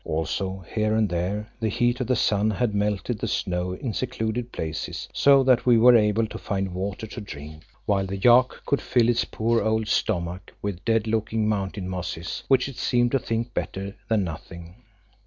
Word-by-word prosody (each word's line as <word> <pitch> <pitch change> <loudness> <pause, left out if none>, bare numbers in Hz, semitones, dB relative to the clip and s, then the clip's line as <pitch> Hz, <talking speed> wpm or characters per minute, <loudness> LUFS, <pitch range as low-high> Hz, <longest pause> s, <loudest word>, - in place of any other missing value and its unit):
Also 95 +4 -3
here 110 0 +1
and 110 -1 +3
there 95 +5 -2
the 110 - 0
heat 120 +4 +1
of 125 - -2
the 125 - +2
sun 105 -1 +2
had 110 +1 0
melted 105 -2 -1
the - - -2
snow 90 0 -1
in 115 +4 -4
secluded 120 -1 -3
places, 80 -1 -4
so 140 -1 +5
that 130 -2 +4
we 120 -2 +6
were 120 +2 +7
able 110 0 +3
to 110 - -7
find 95 -2 -2
water 95 +4 -4
to 110 +1 -8
drink, 75 -4 -9 0.2
while 95 -2 +1
the 100 +1 -4
yak 125 +5 +6 0.2
could 140 - +1
fill 120 -2 +2
its 120 - +2
poor 115 +1 0
old 110 +1 0
stomach 90 -4 -1
with 100 -3 -4
dead 115 -2 +2
looking 110 0 0
mountain 100 -2 -2
mosses, 90 -1 -4
which 135 -1 +3
it 135 -3 -9
seemed 120 -1 +2
to 135 - +2
think 115 0 -3
better 100 +1 -4
than 110 -3 +2
nothing. 85 +1 -8
105 Hz, 190 wpm, -25 LUFS, 95-115 Hz, 0.2 s, were